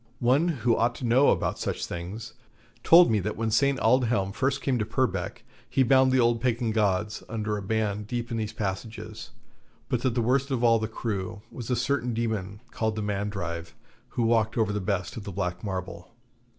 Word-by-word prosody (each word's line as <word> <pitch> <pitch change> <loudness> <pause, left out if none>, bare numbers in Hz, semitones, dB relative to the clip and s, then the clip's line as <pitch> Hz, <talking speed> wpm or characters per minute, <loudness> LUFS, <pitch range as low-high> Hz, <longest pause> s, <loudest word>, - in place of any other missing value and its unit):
One 135 +7 +3
who 120 -8 +1
ought 120 +1 +1
to 125 - -5
know 125 +4 +5
about - - 0
such - - -2
things, 100 +7 -6 0.5
told 170 -4 +7
me 110 - +3
that 105 +3 -3
when 110 0 -1
St. 140 +4 +3
Aldhelm 115 -5 +2
first 135 +5 0
came 130 -3 +1
to - - +1
Purbeck, 110 -2 -2 0.3
he 135 - +3
bound 130 +1 +5
the 130 - +3
old 120 -1 +3
Pagan 120 -2 0
gods 105 0 0
under 110 -1 -2
a 105 - -4
ban 105 0 -1
deep 120 +2 -4
in 115 - -1
these 110 -1 -2
passages, 110 +1 -5 0.6
but 125 - 0
that 125 -2 0
the 120 - +1
worst 135 +4 +1
of 130 -3 -1
all 115 -1 +5
the 110 - -2
crew 105 -2 -4
was 120 -1 -7
a 125 - +2
certain 125 -1 0
demon 105 -3 -3
called 110 -1 -1
the 110 - -3
Mandrive, 95 -5 -3 0.4
who 120 - +2
watched 115 0 +2
over 110 -2 +1
the 105 - -2
best 95 0 -2
of 110 - -6
the 100 - -6
black 90 -1 -3
marble. 95 -2 -5
110 Hz, 200 wpm, -27 LUFS, 105-120 Hz, 0.6 s, told